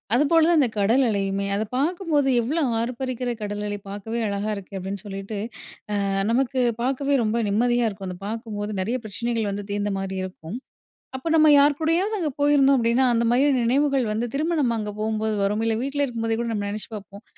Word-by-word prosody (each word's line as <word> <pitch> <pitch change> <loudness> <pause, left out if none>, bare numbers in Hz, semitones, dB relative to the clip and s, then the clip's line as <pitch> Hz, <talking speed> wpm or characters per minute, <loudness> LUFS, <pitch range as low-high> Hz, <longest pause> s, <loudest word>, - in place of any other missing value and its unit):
அதுபோல 315 +4 +4
தான் 335 -3 +5
அந்த 255 -5 +3
கடல் 230 +7 +3
அலையுமே. 200 -1 -1
அதை 215 +2 -1
பாக்கும்போது 310 -2 +1
எவ்வளோ 300 +7 0 0.2
ஆர்ப்பரிக்கிற 250 0 -3
கடல் 205 0 -3
அலை 205 0 -4
பாக்கவே 220 +4 -4
அழகா 200 +1 -2
இருக்கு 195 0 -8
அப்டினு 190 +1 -5
சொல்லிட்டு, 195 +1 -5 0.7
ஆ - - 0 0.2
நமக்கு 260 +2 +1 0.2
பாக்கவே 275 +2 +1
ரொம்ப 215 +2 0
நிம்மதியா 240 +2 +2
இருக்கும். 195 -2 -7
அத 180 - -7
பாக்கும்போது 215 -2 -4
நெறைய 240 +6 -1
பிரச்சனைகள் 225 0 -2
வந்து 200 0 -4
தீர்ந்த 205 0 -1
மாதிரி 190 0 -4
இருக்கும். 185 +1 -7 0.6
அப்போ 260 +5 -6
நம்ப 310 -1 +6
யார் 285 0 +4
கூடயாவது 340 +7 +1
அங்கே 315 -4 -1
போயிருந்தோம் 280 -2 +5
அப்படினா, 235 +2 +2
அந்த 235 0 +2
மகிழும் 265 0 +3
நினைவுகள் 270 +1 +2
வந்து 225 +3 -1
திரும்ப 315 +4 0
நம்ப 240 -3 +2
அங்க 210 -1 -3
போகும்போது 220 0 -1
வரும். 210 +2 0
இல்ல, 225 -1 +1
வீட்ல 280 +1 -1
இருக்கும் 230 -3 -4
போதே 225 0 0
கூட 235 - -2
நம்ப 205 -2 -2
நினைச்சு 210 +1 -5
பாப்போம். 200 +2 -10
230 Hz, 185 wpm, -24 LUFS, 205-275 Hz, 0.7 s, நம்ப